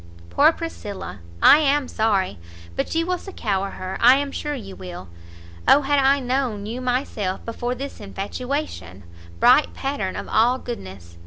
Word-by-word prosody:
Poor 305 +3 +6
Priscilla! 210 - -7 0.2
I 290 - +9
am 290 -2 +2
sorry 200 - 0 0.4
but - - -2
you 330 0 +2
will 360 0 -1
succour 200 - -2
her, 185 -1 -6
I 250 +3 +8
am 280 0 -1
sure 295 +1 -3
you 195 -7 -8
will, 175 - -9 0.6
Oh 290 - +7
had 285 +1 +2
I 275 +1 +4
known 250 -5 -1
you 235 +4 -5
myself 245 -7 -2
before 240 +2 -3
this 275 +2 -7
infatuation 205 - -5 0.4
bright 255 +5 +5
pattern 270 -9 -3
of - - -5
all 240 +3 +3
goodness! 95 - -9
245 Hz, 155 wpm, -23 LUFS, 195-280 Hz, 0.6 s, I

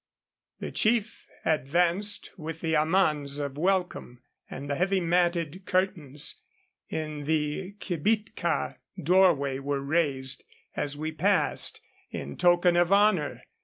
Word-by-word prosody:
The - - -5
chief 220 0 0 0.2
advanced 175 - +1
with 165 -1 -7
amans 155 -3 +2
of 140 -2 -4
welcome, 175 -7 -1 0.3
and 140 +2 -7
the 140 - -1
heavy 190 +5 +1
matted 175 0 0
curtains 170 -7 -1 0.5
in 155 -2 -4
the 155 +5 -1
kibitka 185 -1 -1 0.2
doorway 155 -6 +3
were 140 0 -2
raised, 140 -3 0 0.3
as 145 0 -2
we 155 +1 -3
passed, 190 +6 +1 0.3
in - - -6
token 175 0 +4
of 175 +1 +3
honor. 200 -7 +3
165 Hz, 110 wpm, -27 LUFS, 145-185 Hz, 0.5 s, token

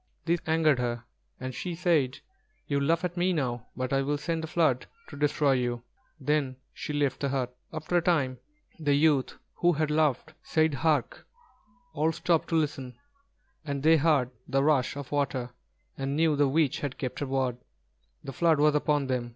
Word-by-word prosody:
This 170 0 +2
angered 160 -4 +3
her, 120 -1 -2 0.4
and 130 0 -5
she 175 +6 -4
said: 160 -7 +1 0.5
"You 140 -1 0
laugh 165 +5 +1
at 175 0 -4
me 180 +1 +2
now; 125 -6 -2
but 130 +1 -2
I 135 - +3
will 145 +2 0
send 160 +2 -2
a - - -3
flood 155 -6 +1 0.2
to - - -9
destroy 145 0 +2
you." 120 -2 0 0.4
Then 140 -2 0 0.2
she - - -5
left 145 -3 0
the 140 - -1
hut. 125 -2 -2 0.2
After 160 +2 -1
a - - +3
time, 140 -7 +1 0.4
the 145 -3 +2
youth 145 -3 +2 0.2
who 175 0 +3
had 155 0 0
laughed, 155 0 +1
said, 160 -1 +1
"Hark!" 150 -2 0 0.7
All 155 +2 +1
stopped 165 0 +1
to 165 - -1
listen, 140 -5 -1 0.7
and 140 -3 -4
they 160 +1 +6
heard 140 -5 +2 0.2
the 135 0 +1
rush 140 -4 +2
of 140 -2 -7
water, 135 -4 -1 0.5
and 135 +1 -2
knew 160 -1 +3
the 145 0 +3
witch 145 0 +1
had 140 -2 -4
kept 130 -3 -4
her 145 - -2
word, 130 -2 0 0.7
the 135 - -7
flood 160 +2 +3
was 150 0 +4
upon 150 -1 +1
them. 125 -2 -2
145 Hz, 185 wpm, -28 LUFS, 130-160 Hz, 0.7 s, they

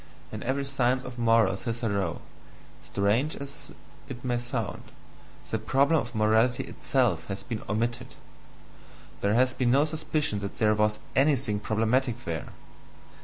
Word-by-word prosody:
In - - -6
every 135 +2 -1
"Science 130 -2 +1
of 125 -1 -8
Morals" 115 -5 +3
hitherto, 110 -6 -1 0.6
strange 110 +10 +1
as 140 0 -9 0.4
it 125 -1 -7
may 120 -1 +1
sound, 120 -3 -3 0.7
the 110 - 0
problem 140 +7 +3
of 120 0 -8
morality 110 +4 +3
itself 125 -9 0
has 100 -1 -5
been 115 -3 -4
OMITTED: 120 +4 -2 1.1
there 100 +2 +2
has 130 +1 +4
been 125 -1 +1
no 140 +4 +5
suspicion 155 -7 -1
that 100 -1 -5
there 105 -1 +3
was 105 0 +2 0.2
anything 135 -7 +2
problematic 115 +3 0
there! 80 -3 -3
120 Hz, 135 wpm, -28 LUFS, 105-130 Hz, 1.1 s, no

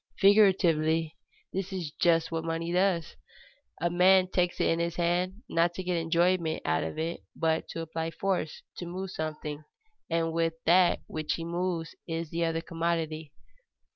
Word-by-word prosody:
Figuratively, 170 -6 +4 0.4
this 190 +1 -3
is 175 -5 -4
just 165 0 +2
what 165 0 -2
money 165 +1 -2
does. 180 -3 +1 0.6
A 170 +2 0
man 185 +1 +5
takes 180 -1 0
it - - +3
in 165 - +1
his 170 0 -1
hand 180 +5 0
not 170 +1 +1
to 185 - -4
get 180 0 -1
enjoyment 170 0 +1
out 80 0 +1
of 80 - -5
it, 165 +2 -3
but 160 -1 0
to 165 - -5
apply 165 0 -3
force, 180 -3 -2
to 175 - -5
move 185 +2 -5
something, 155 -2 -5 0.5
and 165 -1 0 0.3
that 175 +1 +5
which 155 -1 -2
he 165 - -5
moves 170 -1 -2
is 165 -1 -3
the 170 +1 -1
other 165 0 -1
commodity. 165 -2 -2
170 Hz, 160 wpm, -29 LUFS, 160-180 Hz, 0.6 s, man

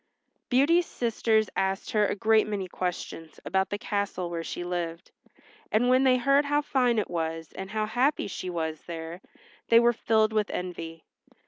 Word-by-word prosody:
Beauty's 310 +7 +4
sisters 220 -2 +1
asked 190 +1 -1
her 210 -1 +3
a - - -1
great 220 0 +3
many 200 -3 -3
questions 175 -3 -5
about 190 0 0
the 205 - -2
castle 200 -4 -2
where 165 -1 -3
she 175 - -5
lived, 175 -1 -4 0.6
and 235 +4 +3
when 255 +1 +4
they 255 -1 +5
heard 275 +3 +3
how 290 +1 +1
fine 250 -4 +2
it 215 - 0
was, 165 -2 -3
and 190 0 -7
how 215 +1 -1
happy 255 +7 +1
she 185 -1 -5
was 160 -3 -3
there, 165 +1 -6 0.5
they 230 - +7
were 240 0 +4
filled 220 -1 +2
with 215 -1 +1
envy. 165 -2 -6
205 Hz, 175 wpm, -27 LUFS, 175-235 Hz, 0.6 s, they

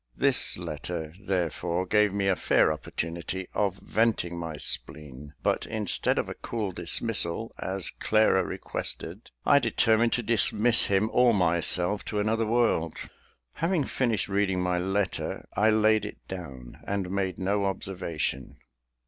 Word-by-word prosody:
This - - +4
letter, 80 -3 -5
therefore, 90 -2 -2
gave 105 +1 +3
me 100 0 -1
a 95 - +3
fair - - +3
opportunity 85 +3 -5
of 100 -3 0
venting 105 -5 0
my 80 -3 -5
spleen; 75 -1 -3
but - - 0
instead 110 -3 +1
of - - 0
a - - -5
cool 110 -4 -4
dismissal, 90 +3 0
as 95 -2 -3
Clara 110 -3 +3
requested, 90 +3 -6 0.2
I 140 - +6
determined 115 -3 +2
to 120 - 0
dismiss 115 +1 +4
him 100 +3 +1
or 125 -2 +4
myself 90 +2 +2
to 105 - -2
another 110 +2 0
world. 110 -8 +1 0.6
Having 165 -2 0
finished 120 -5 -1
reading 95 -2 0
my 90 0 0
letter, 95 +1 -2
I 110 +2 +3
laid 110 -1 +3
it 105 - -7
down, 70 -10 -9
and 100 -2 -2
made 95 -2 -2
no 100 +2 0
observation. 85 -8 -4
95 Hz, 140 wpm, -27 LUFS, 85-110 Hz, 0.6 s, I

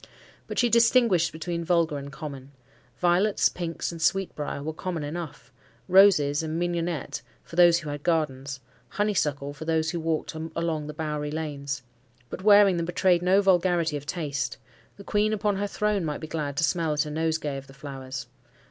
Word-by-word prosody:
But - - -6
she 245 - +4
distinguished 230 -6 +4
between 170 +1 -4
vulgar 165 -3 +1
and 140 0 -8
common. 140 -2 -8 0.4
Violets, 180 +4 +3
pinks, 170 -1 -4
and 165 -1 -8
sweetbriar 165 -6 -1
were 160 +1 -3
common 170 -1 -4
enough; 150 -5 -6 0.4
roses 180 -7 +5
and 160 +1 -3
mignionette, 175 -2 -2 0.2
for - - -12
those 175 -1 +6
who 155 - -6
had 145 0 -5
gardens, 140 -5 -1 0.3
honeysuckle 150 -9 -1
for 150 +2 -8
those 160 0 +1
who 175 - -3
walked 160 0 -2
along 160 -1 -3
the 150 - -7
bowery 150 -1 -3
lanes; 145 -3 -4 0.5
but - - -6
wearing 205 -2 +6
them 170 -1 -2
betrayed 175 0 +2
no 190 +3 +4
vulgarity 175 -4 +2
of 145 0 -6
taste: 145 -5 -3 0.4
the 200 - -10
queen 210 +2 +1
upon 205 -1 0
her 205 +1 -1
throne 210 -2 0
might 150 -2 -2
be - - -7
glad 150 -3 -4
to 165 - +1
smell 165 -1 +1
at 150 +1 +1
a 150 - -6
nosegay 160 -2 -1
of 135 0 -9
the 135 - -14
flowers. 135 -2 -7
160 Hz, 175 wpm, -26 LUFS, 150-180 Hz, 0.5 s, those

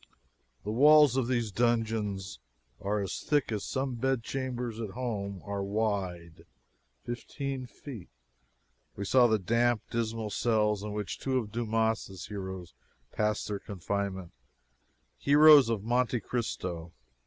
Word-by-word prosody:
The 105 - -3
walls 145 +2 +6
of 130 -3 +1
these 120 -4 0
dungeons 110 - -1 0.4
are 105 +1 0
as 100 - -4
thick 145 -5 +1
as 105 -2 -2
some 130 -1 -2
bed 130 0 0
chambers 125 -3 -4
at 110 -3 -4
home 100 -6 -4
are 100 -1 -3
wide 95 -6 -3 0.6
fifteen 130 +2 -5
feet. 120 - -10 0.9
We 100 - -4
saw 125 +4 +5
the 110 -1 +3
damp, 115 +3 +1
dismal 115 -2 -2
cells 105 -2 +1
in 105 0 -5
which 105 -2 -4
two 130 -1 0
of 110 -5 -3
Dumas' 110 -4 -1
heroes 95 -4 -6 0.4
passed 105 0 -1
their 105 -1 -3
confinement 95 -2 -4 0.9
heroes 145 -2 +7
of 110 -4 -1
"Monte 120 +1 +1
Cristo." 85 -8 -4
110 Hz, 130 wpm, -30 LUFS, 100-120 Hz, 0.9 s, heroes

